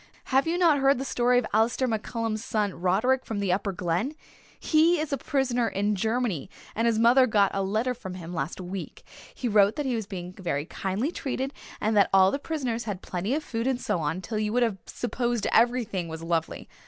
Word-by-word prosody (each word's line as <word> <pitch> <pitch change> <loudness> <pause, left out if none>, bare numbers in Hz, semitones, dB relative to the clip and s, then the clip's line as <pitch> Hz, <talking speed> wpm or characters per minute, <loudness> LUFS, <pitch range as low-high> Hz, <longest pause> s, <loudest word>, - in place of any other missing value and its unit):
Have 270 +3 +4
you 340 +2 +1
not 330 -5 +4
heard 275 0 +4
the 265 - -4
story 245 -1 +2
of 245 - +2
Alistair 230 +4 +2
MacCallum's 225 -1 -2
son 210 -5 -1
Roderick, 215 +9 +1
from 220 - -4
the 195 -3 +1
Upper 200 +1 -1
Glen? 180 - -2 0.4
He 325 +2 +3
is 305 -2 -2
a - - +1
prisoner 260 -5 0
in 205 +1 0
Germany 220 - -1 0.2
and 230 +2 +1
his 230 -2 +2
mother 245 +3 +5
got 205 -3 +3
a 195 - 0
letter 215 +6 0
from 190 -7 -8
him 175 -1 -8
last 170 +1 -3
week. 185 +1 -7 0.3
He 250 - -3
wrote 205 -1 +4
that 295 - -2
he 260 - 0
was 220 -4 -3
being 180 -3 -6
very 160 -6 -3
kindly 195 - -2
treated 270 -3 -3 0.3
and 215 +1 0
that 200 - +5
all 190 0 +6
the 280 - -2
prisoners 260 -7 -3
had 200 -4 -5
plenty 190 +8 -2
of 310 - -2
food 230 -2 -3
and 260 -2 0
so 180 - -1
on, 160 +4 -2
till 215 +2 -3
you 210 0 -1
would 245 0 +3
have 215 -5 -1
supposed 240 -2 -2
everything 230 -7 +2
was 160 0 -7
lovely. 165 -1 -2
225 Hz, 215 wpm, -27 LUFS, 190-255 Hz, 0.4 s, all